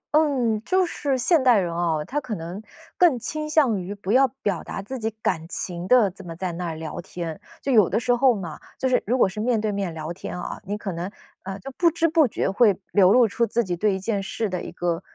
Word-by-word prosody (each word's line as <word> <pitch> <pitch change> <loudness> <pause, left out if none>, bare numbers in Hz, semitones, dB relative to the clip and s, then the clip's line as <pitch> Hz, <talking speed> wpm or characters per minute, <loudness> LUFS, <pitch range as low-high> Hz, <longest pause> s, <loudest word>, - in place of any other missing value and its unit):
嗯， 255 -8 +2
就 370 +8 +2
是 285 -6 -1
现 285 +3 +3
代 245 -3 +6
人 175 -4 0
啊， 160 -3 0
他 295 +3 -2
可 240 -5 -4
能 170 +4 -6 0.4
更 340 -8 +5
倾 305 +6 -4
向 260 - +3
于 195 +3 -6
不 200 -1 -4
要 265 +3 +5 0.2
表 205 - 0
达 - - -6
自 250 +6 -6
己 220 0 -1
感 160 0 -1
情 175 -1 -4
的， 230 -5 +5
这 195 +2 -12
么 170 -2 -7
在 180 +1 -3
那 175 +1 -4
儿 165 - -4
聊 160 -1 -6
天。 170 -2 -6 0.2
就 275 - 0
有 215 -7 +5
的 - - +1
时 245 0 +1
候 250 -1 +4
嘛 175 -6 -6 0.2
就 260 - 0
是 255 - +2
如 250 +4 +2
果 235 - +5
是 190 +3 -7
面 230 0 +1
对 215 -1 -1
面 200 -3 -2
聊 160 +1 -5
天 180 0 -6
啊， - - -6
你 205 +2 -3
可 205 -2 -4
能 175 +3 -4 0.3
呃， 195 0 -6
就 270 - -8
不 340 +6 +3
知 330 0 +1
不 315 -3 +4
觉 - - -2
会 205 -2 +4
流 190 -2 +5
露 240 0 +6
出 235 +3 0
自 235 - +1
己 180 -4 -2
对 200 +3 +1
一 190 - -4
件 200 0 -1
事 205 +2 -3
的 180 -2 -2
一 - - -7
个， 175 -1 -2
210 Hz, 275 characters per minute, -24 LUFS, 180-255 Hz, 0.4 s, 代